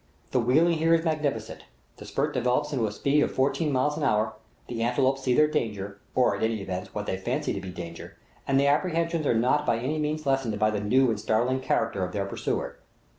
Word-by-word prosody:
The 130 - +2
wheeling 155 +9 +3
is 160 - -2
here 165 +1 +4
magnificent, 150 -9 -2 0.3
the - - -10
spurt 150 +2 -1
develops 125 +4 0
into 120 -5 +1
a - - -4
speed 140 +7 +1
of - - +1
fourteen 145 +3 +1
miles 145 +3 +1
an 155 - -3
hour; 110 -4 +1 0.3
the 115 -2 -4
antelopes 130 +3 +1
see 125 -2 +1
their 150 +2 +5
danger, 100 -7 -3 0.2
or, 125 -5 +3
at - - -6
all 110 - +2
events, 95 -5 -5
what 105 0 -3
they 95 - -2
fancy 95 - -2
to - - -4
be 95 - -7
danger, 85 -2 -8 0.3
and 135 0 +3
their 140 +1 +4
apprehensions 165 -1 0
are - - +3
not 130 +6 +2
by 115 - +1
any 135 +7 -2
mean 150 +1 -1
lessened 135 -6 0
by 110 +1 +2
the 105 -1 -2
new 125 +4 +3
and 110 - -2
startling 120 +5 +1
character 115 -6 0
of 90 0 -4
their 100 -1 -1
pursuer. 100 - -3
125 Hz, 225 wpm, -27 LUFS, 110-150 Hz, 0.3 s, their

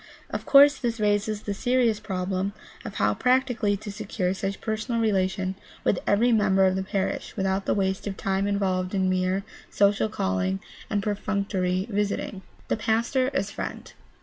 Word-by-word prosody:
Of - - -4
course 285 +1 +8
this 235 -3 -2
raises 210 0 +1
the 205 - -2
serious 245 -1 +2
problem 190 -1 -2 0.3
of 210 - -7
how 105 0 +2
practically 245 - +2
to 205 +1 -7
secure 195 -3 -2
such 195 0 -3
personal 225 +2 -2
relation 190 -3 +1 0.3
with 190 - +2
every 230 +4 +4
member 195 -4 +4
of 185 0 +2
the 190 - 0
parish 190 +2 -3
without 195 0 0
the - - +2
waste 190 0 -1
of 195 - -4
time 195 +1 0
involved 190 -2 0
in 190 -1 +2
mere 185 +1 0 0.3
social 205 +2 +2
calling 95 - -1 0.3
and 205 -2 0
perfunctory 200 -3 -1
visiting. 205 -2 -2 0.3
The - - 0
pastor 235 +4 +1
as 200 -6 0
friend. - - -6
200 Hz, 160 wpm, -26 LUFS, 190-220 Hz, 0.3 s, course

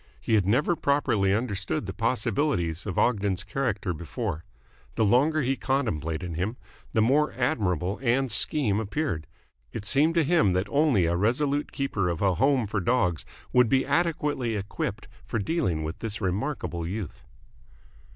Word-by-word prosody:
He - - -2
had 100 -4 +3
never 140 - +2
properly 140 -10 +1
understood 100 -6 -1
the - - -5
possibilities 100 - 0
of 95 - -4
Ogden's 100 -5 +1
character 105 -4 -2
before. 85 - -4 0.5
The 110 - +2
longer 145 +8 +3
he 135 +2 +1
contemplated 85 - -2
him, 100 +9 -2 0.3
the 110 - +3
more 145 +6 +2
admirable 100 - 0
Ann's 130 -1 +1
scheme 110 -9 +2
appeared. 110 - -2 0.4
It 105 - -6
seemed 150 +7 +3
to 165 - +4
him 145 - +3
that 90 +2 +1
only 140 - +3
a 85 +1 +1
resolute 140 +9 0
keeper 110 -10 -1
of 85 -2 -2
a 95 -2 +3
home 130 +4 +2
for 100 0 -2
dogs 90 -5 +1 0.3
would 125 -2 +5
be 135 -1 +3
adequately 145 -6 0
equipped 100 0 -4 0.2
for - - -3
dealing 100 - -1
with 80 +2 -5
this 110 -2 -4
remarkable 95 - -2
youth. 95 -2 -5
110 Hz, 150 wpm, -26 LUFS, 95-135 Hz, 0.5 s, would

